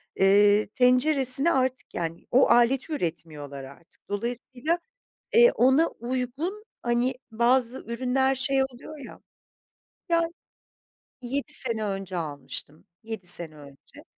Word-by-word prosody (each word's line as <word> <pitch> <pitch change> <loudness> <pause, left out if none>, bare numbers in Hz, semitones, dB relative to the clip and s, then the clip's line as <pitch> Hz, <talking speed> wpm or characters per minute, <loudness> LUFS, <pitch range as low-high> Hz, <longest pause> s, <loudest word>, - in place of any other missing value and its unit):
eee, 205 +2 +4
tenceresine 255 +5 +4
artık 260 -2 -2
yani 165 -1 -5
o 255 - +4
aleti 260 +6 +2
üretmiyorlar 155 - -6
artık. 140 +6 -17
Dolayısıyla, 245 - -3 0.6
eee, 480 +1 +7
ona 265 - +3
uygun, 260 - -5 0.2
hani 240 +2 0 0.2
bazı 240 +2 +1
ürünler 260 +3 0
şey 270 +1 +1
oluyor 265 +4 -9
ya. - - -13 0.9
Ya 335 0 +2 1.0
7 275 +4 -4
sene 230 -6 +4
önce 195 -2 -5
almıştım, 150 +1 -6 0.2
7 220 -5 -7
sene 170 -3 +3
önce. 140 -2 -16
240 Hz, 110 wpm, -25 LUFS, 195-265 Hz, 1.0 s, eee